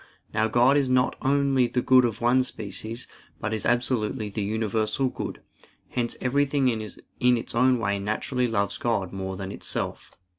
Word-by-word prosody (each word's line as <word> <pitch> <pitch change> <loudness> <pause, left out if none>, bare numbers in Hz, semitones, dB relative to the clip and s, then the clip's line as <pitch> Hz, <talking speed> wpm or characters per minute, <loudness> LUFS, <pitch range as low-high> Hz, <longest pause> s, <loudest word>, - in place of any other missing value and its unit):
Now 110 +1 +2
God 120 +5 +4
is 135 -3 +1
not 130 0 +2
only 135 -2 +3
the 125 +1 -1
good 130 -1 +6
of 115 -2 -3
one 125 +2 +4
species, 110 0 -6 0.3
but 110 - -2
is 110 - -1
absolutely 120 -2 0
the 105 - -3
universal 110 +4 0
good; - - -6 0.5
hence 120 -1 -2
everything 140 +1 +2
in 115 -2 -1 0.6
its 115 - -6
own 125 +2 +4
way 100 -3 -1
naturally 120 +5 -1
loves 100 -3 -1
God 100 -6 -1
more 95 -1 -4
than 95 0 -5
itself. - - -4
120 Hz, 160 wpm, -26 LUFS, 105-130 Hz, 0.6 s, good